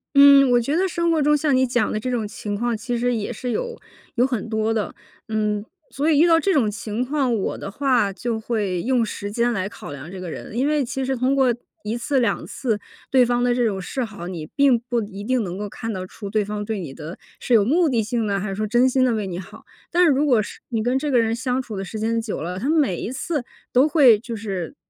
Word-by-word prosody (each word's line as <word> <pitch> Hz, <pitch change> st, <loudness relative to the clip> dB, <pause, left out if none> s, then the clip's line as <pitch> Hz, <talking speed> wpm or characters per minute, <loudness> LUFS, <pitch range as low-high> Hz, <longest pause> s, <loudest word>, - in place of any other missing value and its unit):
嗯， 280 Hz, -1 st, +8 dB
我 245 Hz, -, +5 dB
觉 275 Hz, +6 st, -1 dB
得 370 Hz, +3 st, +2 dB
生 340 Hz, 0 st, 0 dB
活 325 Hz, -2 st, +2 dB
中 295 Hz, +1 st, +4 dB
像 290 Hz, -2 st, +2 dB
你 260 Hz, 0 st, +4 dB
讲 245 Hz, 0 st, +1 dB
的 -, -, -1 dB
这 255 Hz, +4 st, -3 dB
种 230 Hz, -4 st, -1 dB
情 205 Hz, 0 st, -5 dB
况， 235 Hz, +3 st, -1 dB
其 240 Hz, +3 st, -3 dB
实 245 Hz, +1 st, +1 dB
也 220 Hz, +1 st, -3 dB
是 245 Hz, +2 st, -4 dB
有 480 Hz, -, -3 dB, 0.4 s
有 245 Hz, +1 st, +3 dB
很 230 Hz, -4 st, -3 dB
多 220 Hz, 0 st, 0 dB
的。 215 Hz, -2 st, -2 dB, 0.4 s
嗯， 210 Hz, -1 st, 0 dB, 0.3 s
所 290 Hz, +3 st, 0 dB
以 290 Hz, -, +4 dB
遇 335 Hz, -, +6 dB
到 330 Hz, -1 st, +6 dB
这 390 Hz, +4 st, +1 dB
种 245 Hz, -9 st, +3 dB
情 215 Hz, +2 st, -3 dB
况， 270 Hz, -2 st, 0 dB
我 210 Hz, -4 st, -1 dB
的 200 Hz, -, -6 dB
话 250 Hz, -4 st, +2 dB
就 230 Hz, +4 st, -3 dB
会 210 Hz, -6 st, -2 dB
用 245 Hz, 0 st, +2 dB
时 205 Hz, -1 st, -5 dB
间 235 Hz, +2 st, +1 dB
来 190 Hz, -2 st, -2 dB
考 205 Hz, -9 st, -9 dB
量 145 Hz, +4 st, -9 dB
这 190 Hz, -, -7 dB
个 180 Hz, -1 st, -6 dB
人。 165 Hz, -, -8 dB
因 265 Hz, +3 st, +2 dB
为 300 Hz, -1 st, +2 dB
其 265 Hz, +2 st, -3 dB
实 265 Hz, 0 st, 0 dB
通 255 Hz, +2 st, +1 dB
过 260 Hz, -3 st, +3 dB, 0.3 s
1 220 Hz, +3 st, -2 dB
次 265 Hz, +3 st, 0 dB
2 240 Hz, -, 0 dB
次， 230 Hz, -5 st, -2 dB, 0.3 s
对 255 Hz, -2 st, +5 dB
方 245 Hz, 0 st, +1 dB
的 245 Hz, 0 st, +2 dB
这 245 Hz, -1 st, +2 dB
种 195 Hz, -4 st, -1 dB
示 255 Hz, +7 st, -3 dB
好， 205 Hz, -6 st, -7 dB
你 170 Hz, -4 st, -5 dB
并 275 Hz, -3 st, +4 dB
不 240 Hz, -1 st, +1 dB
一 200 Hz, -1 st, -7 dB
定 255 Hz, +3 st, +1 dB
能 180 Hz, 0 st, -5 dB
够 205 Hz, 0 st, -4 dB
看 225 Hz, +3 st, -5 dB
得 185 Hz, -1 st, -4 dB
出 200 Hz, +2 st, -8 dB
对 215 Hz, +1 st, +1 dB
方 210 Hz, 0 st, -4 dB
对 220 Hz, 0 st, -2 dB
你 150 Hz, -6 st, -7 dB
的 155 Hz, +5 st, -8 dB, 0.2 s
是 250 Hz, -, -1 dB
有 220 Hz, -3 st, +6 dB
目 325 Hz, -, +3 dB
的 235 Hz, -6 st, +1 dB
性 225 Hz, 0 st, -1 dB
的， 200 Hz, -1 st, 0 dB
还 195 Hz, +1 st, -3 dB
是 195 Hz, -, -3 dB
说 215 Hz, +2 st, -2 dB
真 240 Hz, +4 st, +4 dB
心 260 Hz, 0 st, +3 dB
地 250 Hz, -, +2 dB
为 215 Hz, -2 st, -1 dB
你 180 Hz, -2 st, -4 dB
好。 185 Hz, -, -11 dB, 0.3 s
但 355 Hz, +1 st, +4 dB
是 345 Hz, -, +6 dB
如 280 Hz, +2 st, +2 dB
果 245 Hz, -7 st, +3 dB
是 -, -, -9 dB
你 225 Hz, -3 st, -1 dB
跟 250 Hz, +3 st, +1 dB
这 295 Hz, +1 st, -2 dB
个 255 Hz, -3 st, +4 dB
人 225 Hz, -1 st, +1 dB
相 255 Hz, +2 st, -1 dB
处 225 Hz, -5 st, -7 dB
的 195 Hz, -, -4 dB
时 215 Hz, -, -6 dB
间 225 Hz, +1 st, 0 dB
久 225 Hz, -2 st, -4 dB
了， 180 Hz, +3 st, -4 dB
他 265 Hz, -, -2 dB
每 295 Hz, -, +2 dB
一 -, -, -4 dB
次 285 Hz, -1 st, -3 dB, 0.3 s
都 255 Hz, +4 st, +5 dB
会 270 Hz, -9 st, +6 dB
就 235 Hz, +1 st, -6 dB
是 195 Hz, -6 st, -5 dB
235 Hz, 280 characters per minute, -22 LUFS, 210-265 Hz, 0.4 s, 嗯